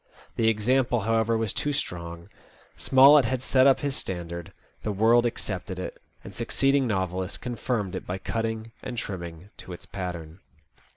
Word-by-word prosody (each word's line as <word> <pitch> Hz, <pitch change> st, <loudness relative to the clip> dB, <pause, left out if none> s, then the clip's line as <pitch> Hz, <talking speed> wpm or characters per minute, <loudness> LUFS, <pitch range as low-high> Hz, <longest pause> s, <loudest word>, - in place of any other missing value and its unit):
The 115 Hz, -, +2 dB
example, 120 Hz, +2 st, +2 dB
however, 115 Hz, +2 st, +2 dB
was 110 Hz, -3 st, -1 dB
too 145 Hz, -, -1 dB
strong. 85 Hz, -9 st, -4 dB, 0.5 s
Smollett 135 Hz, +1 st, +7 dB
had 130 Hz, +1 st, -1 dB
set 130 Hz, 0 st, +4 dB
up 135 Hz, -, +4 dB
his 140 Hz, -2 st, -1 dB
standard. 85 Hz, -2 st, -5 dB, 0.3 s
The 105 Hz, -, -2 dB
world 115 Hz, +4 st, +4 dB
accepted 95 Hz, -4 st, -4 dB
it, 90 Hz, -, -6 dB, 0.2 s
and -, -, -10 dB
succeeding 135 Hz, -1 st, +1 dB
novelists 95 Hz, -2 st, -2 dB
con 120 Hz, -1 st, -5 dB
firmed 105 Hz, -6 st, -2 dB
it 95 Hz, -, -6 dB
by 90 Hz, -, -2 dB
cutting 115 Hz, +2 st, -3 dB
and 120 Hz, -, -6 dB
trimming 85 Hz, -2 st, -6 dB
to 90 Hz, -, -9 dB
its 85 Hz, -, -10 dB
pattern. 90 Hz, -3 st, -6 dB
110 Hz, 160 wpm, -26 LUFS, 90-120 Hz, 0.5 s, Smollett